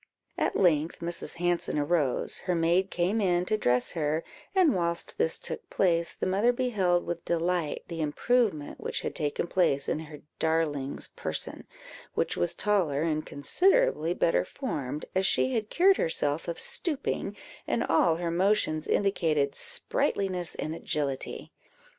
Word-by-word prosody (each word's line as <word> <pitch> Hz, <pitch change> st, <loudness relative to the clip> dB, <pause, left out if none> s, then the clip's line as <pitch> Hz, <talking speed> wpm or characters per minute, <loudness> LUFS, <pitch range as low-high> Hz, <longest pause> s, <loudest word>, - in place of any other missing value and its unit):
At -, -, 0 dB
length 165 Hz, -4 st, +2 dB
Mrs. 170 Hz, 0 st, -4 dB
Hanson 175 Hz, -2 st, 0 dB
arose; 150 Hz, -3 st, +1 dB
her 180 Hz, -, +3 dB
maid 170 Hz, +3 st, +2 dB
came 185 Hz, +6 st, 0 dB
in 180 Hz, -2 st, +2 dB
to 215 Hz, -, +1 dB
dress 125 Hz, -10 st, +1 dB
her, 155 Hz, -1 st, -1 dB, 0.3 s
and 360 Hz, -6 st, +5 dB
whilst 170 Hz, -1 st, -2 dB
this 160 Hz, -, +3 dB
took -, -, -4 dB
place, 170 Hz, -3 st, +1 dB
the -, -, -3 dB
mother 200 Hz, +6 st, +3 dB
beheld 205 Hz, -9 st, +1 dB
with 170 Hz, -1 st, -4 dB
delight 170 Hz, -2 st, -1 dB
the 165 Hz, -2 st, -4 dB
improvement 175 Hz, +1 st, 0 dB
which -, -, -3 dB
had -, -, -3 dB
taken 150 Hz, -1 st, -1 dB
place 155 Hz, -6 st, +1 dB
in -, -, 0 dB
her 155 Hz, -2 st, -10 dB, 0.2 s
darling's 155 Hz, -4 st, -1 dB
person, -, -, -5 dB, 0.5 s
which -, -, 0 dB
was 85 Hz, 0 st, 0 dB
taller, 175 Hz, -9 st, +1 dB
and 155 Hz, -2 st, -1 dB
considerably 265 Hz, -, +2 dB
better 165 Hz, -, +2 dB
formed, 150 Hz, -, -4 dB
as 190 Hz, +1 st, +2 dB
she 260 Hz, -, +2 dB
had 220 Hz, -3 st, -1 dB
cured 380 Hz, +2 st, +4 dB
herself 155 Hz, -1 st, 0 dB
of 170 Hz, -, -4 dB
stooping, 270 Hz, -, -2 dB, 0.3 s
and 230 Hz, -, +1 dB
all 165 Hz, 0 st, +3 dB
her 170 Hz, 0 st, -2 dB
motions 175 Hz, -4 st, +1 dB
indicated 155 Hz, -8 st, +1 dB
sprightliness 185 Hz, +1 st, 0 dB
and 155 Hz, -, -3 dB
agility. 145 Hz, -5 st, -3 dB
170 Hz, 145 wpm, -28 LUFS, 155-195 Hz, 0.5 s, and